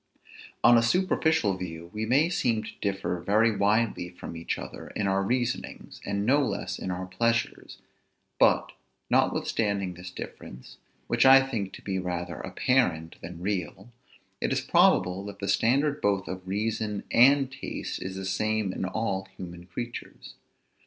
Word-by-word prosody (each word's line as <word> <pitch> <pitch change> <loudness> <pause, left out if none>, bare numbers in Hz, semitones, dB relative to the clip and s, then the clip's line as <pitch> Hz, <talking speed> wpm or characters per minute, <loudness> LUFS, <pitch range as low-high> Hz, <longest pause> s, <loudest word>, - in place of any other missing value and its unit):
On 120 0 +7
a - - +2
superficial 160 - +2
view 85 -2 -7
we 110 +1 -3
may 140 +7 +4
seem 120 -10 0
to - - -7
differ 95 -3 -1
very 105 +5 +2
widely 105 -2 +1
from 90 -1 -9
each 85 +1 -3
other - - -8
in 105 - -1
our 95 0 +2
reasonings, 120 +4 -3
and 100 0 -2
no 140 +5 +4
less - - -3
in - - -4
our 90 +1 -3
pleasures: 115 +6 -1 0.6
but, - - +4 0.4
notwithstanding 100 -4 +1
this 90 +1 -9
difference, 65 -7 -10 0.3
which - - +2
I 135 0 +8
think 110 -8 -3
to - - -11
be 95 -2 -2
rather 90 -1 -4
apparent 85 -11 0
than 85 0 -8
real, 95 +3 -3 0.5
it - - 0
is - - +1
probable 90 +2 +3
that 100 -1 -8
the 100 - -5
standard 140 +9 +2
both 100 -2 +1
of 95 0 -6
reason 105 +1 -2
and 135 +2 +5
taste 135 0 -5
is 95 0 -5
the 95 0 -5
same 105 +1 0
in 95 - -3
all 95 -1 -2
human 85 -1 -9
creatures. 120 +6 -7
100 Hz, 155 wpm, -27 LUFS, 95-115 Hz, 0.6 s, I